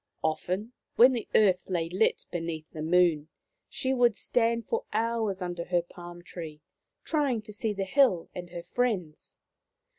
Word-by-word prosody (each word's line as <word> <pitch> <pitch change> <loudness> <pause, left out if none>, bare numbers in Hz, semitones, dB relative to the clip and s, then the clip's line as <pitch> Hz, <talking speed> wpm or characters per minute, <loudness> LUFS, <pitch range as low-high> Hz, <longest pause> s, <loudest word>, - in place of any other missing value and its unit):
Often 185 +8 -2 0.2
when 250 +3 +8
the 235 -3 -3
earth 190 -4 +4
lay 170 -3 0
lit 185 +6 +1
beneath 165 -2 -4
the 155 - -7
Moon 165 -2 +3 0.4
she 265 -1 -1
would 240 -4 +3
stand 230 0 +1
for 465 +1 -1
hours 220 -4 -1
under 175 -1 -4
her 175 -1 +1
palm 175 0 -11
tree, 160 -4 -8 0.4
trying 280 -8 0
to 210 -1 -11
see 215 +1 -1
the 195 -1 -2
hill 190 -6 +3
and 175 -1 -7
her 170 -1 -7
friends. 180 -6 -2
185 Hz, 155 wpm, -28 LUFS, 175-230 Hz, 0.4 s, when